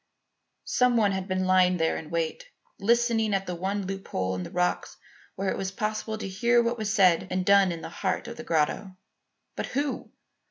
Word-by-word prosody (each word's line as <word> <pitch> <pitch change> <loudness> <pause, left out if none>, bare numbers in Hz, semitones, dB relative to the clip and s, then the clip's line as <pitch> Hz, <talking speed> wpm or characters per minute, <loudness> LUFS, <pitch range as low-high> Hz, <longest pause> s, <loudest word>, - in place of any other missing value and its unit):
Some 250 -1 +2
one 210 -3 +3
had 190 -1 -3
been 185 -1 -1
lying 185 -1 +4
there 160 -1 +1
in 155 - -7
wait, 165 - -2 0.3
listening 230 -1 +2
at 195 0 -1
the 180 - -4
one 190 +3 -2
loophole 185 - -3
in 90 - -3
the - - -6
rocks 180 0 -1 0.4
where 195 0 -1
it - - -3
was 190 -1 -2
possible 215 +1 -3
to 215 - -5
hear 235 +5 +2
what 235 0 -1
was 215 -1 -1
said 185 -4 +4
and 185 0 -1
done 200 -1 +5
in 165 -1 -5
the - - -7
heart 190 +3 -2
of 235 - -7
the 240 - -8
grotto. 170 +3 0 0.6
But - - -3
who? 280 0 -2
195 Hz, 200 wpm, -27 LUFS, 180-220 Hz, 0.6 s, done